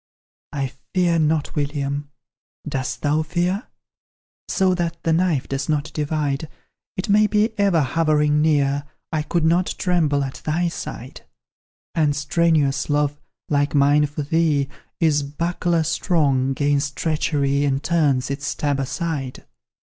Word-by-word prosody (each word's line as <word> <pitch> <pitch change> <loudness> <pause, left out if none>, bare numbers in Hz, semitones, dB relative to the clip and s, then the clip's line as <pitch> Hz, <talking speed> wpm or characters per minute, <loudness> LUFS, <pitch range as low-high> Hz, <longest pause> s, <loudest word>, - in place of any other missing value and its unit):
I 135 -3 -2 0.2
fear 175 -2 +3
not, 155 -1 +1
William; 145 -1 -2 0.6
dost 135 -3 -3
thou 150 +1 +2
fear? 175 +6 -1 0.8
So 190 -1 +2
that 170 -2 -2
the 165 - +2
knife 165 -5 +1
does 135 +1 -3
not 150 0 -1
divide, 150 -1 -1 0.5
It 185 - -2
may 210 +1 +5
be 210 +1 +2
ever 195 -5 +3
hovering 150 0 +2
near: 145 -2 +2 0.3
I 155 -2 0
could 160 +2 0
not 175 +3 +2
tremble 155 -6 +1
at 135 -1 -6
thy 170 +3 0
side, 130 -6 -7 0.7
And 150 -3 +2
strenuous 150 -2 +1
love 145 0 0 0.3
like 145 0 +1
mine 145 +1 +4
for 145 +1 -4
thee 150 -2 +1 0.3
Is 155 -3 +3
buckler 170 +3 -1
strong 145 -5 +1
'gainst 145 +1 0
treachery, 145 -3 0
And 140 -1 0
turns 145 -6 +1
its 140 +1 -4
stab 145 -2 -1
aside. 135 -1 -3
150 Hz, 135 wpm, -22 LUFS, 140-165 Hz, 0.8 s, may